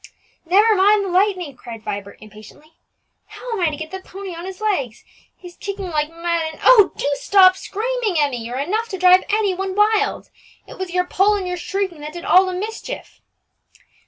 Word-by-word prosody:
"Never 415 +6 +5
mind 405 +1 +4
the - - -4
lightning," 365 -5 0
cried 230 -3 -10
Vibert 200 0 -6
impatiently. 215 +9 -15 0.5
"How - - -9
am 450 - -2
I 340 - +3
to 300 - -6
get 315 +1 -7
the 380 - -5
pony 380 0 -9
on 340 +1 -8
his 380 -1 -8
legs? 330 - -2 0.3
he's 355 -1 -13
kicking 395 -2 -6
like 300 -1 -1
mad; 335 -1 -2
and, - - -15
oh! 425 -6 +7
do - - -2
stop 375 -2 +5
screaming, 440 +1 -3
Emmie, 280 -6 0
you're 240 +2 -5
enough 425 +12 -2
to 380 - -5
drive 365 0 +5
any 415 -2 +1
one 380 +1 -4
wild. 420 0 +1 0.3
It - - -13
was 375 -1 -4
your 360 +1 0
pull 395 +3 +2
and 385 -3 -3
your 360 0 -3
shrieking 375 -3 -3
that 300 +1 -7
did 345 0 -8
all 375 +1 +5
the 370 - -3
mischief." 440 +6 -7
370 Hz, 195 wpm, -20 LUFS, 315-405 Hz, 0.5 s, oh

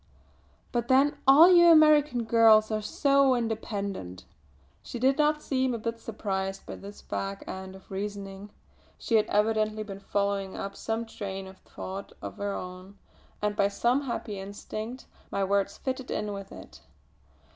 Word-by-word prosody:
"But 240 -1 -1
then 270 +3 +3
all 310 +7 +9
you 345 -1 +7
American 305 -6 +6
girls 220 -1 +5
are 215 0 0
so 275 +4 +3
independent!" 200 - -4 0.6
She - - -7
did 265 +4 +2
not 300 0 +2
seem 260 -2 0
a - - -2
bit 230 +1 -4
surprised 195 -4 -4
by - - -7
this 200 +1 -11
fag 195 0 -5
end 190 0 -7
of 190 - -16
reasoning; 200 0 -5 0.5
she 235 - -5
had 215 -1 +4
evidently 215 0 +1
been 195 -2 -8
following 200 -1 -2
up 200 0 -5
some 225 +1 -3
train 195 -3 -6
of 190 0 -13
thought 195 +1 -8
of - - -8
her 200 0 -2
own, 185 +2 -8 0.5
and 210 0 0
by 200 - +3
some 240 +7 +1
happy 215 -5 -4
instinct 215 +5 -7 0.2
my 200 - -1
words 200 0 0
fitted 260 -1 -4
in 210 -1 -2
with 195 -1 -8
it. - - -12
215 Hz, 155 wpm, -28 LUFS, 195-245 Hz, 0.6 s, all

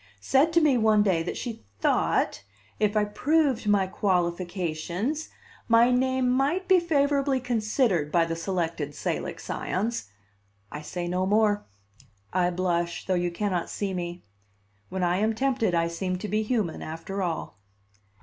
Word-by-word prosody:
said 280 +5 +3
to 335 - +5
me 290 -6 +3
one 215 -1 +4
day 185 -5 +2
that 165 - -4
she 235 -3 -6 0.2
thought, - - +1 0.4
if 210 0 +2
I 210 - +3
proved 270 +1 +1
my 205 -2 +4
qualifications, 180 - -1 0.4
my 230 +1 +5
name 260 0 +2
might 280 +9 +1
be 375 -1 +6
favorably 285 -4 +1
considered 215 - 0
by 170 -1 +3
the 165 0 -3
Selected 165 -4 -2
Salic - - -3
Scions 210 - -3 0.6
I 150 - -6
say 175 +3 -4
no 180 +2 0
more; 210 0 +2 0.7
I 180 -1 +2
blush, 175 -1 -1
though 190 - 0
you 175 -1 +1
cannot 180 -1 -2
see 200 -2 -3
me; 175 -1 -5 0.7
when 190 0 -2
I 175 +1 +2
am 220 +2 +1
tempted, 245 -7 +1
I 165 0 +2
seem 185 +2 -2
to 210 - -5
be 215 +1 0
human, 215 -7 -1
after 165 +5 -5
all. 165 - -3
200 Hz, 150 wpm, -26 LUFS, 175-250 Hz, 0.7 s, be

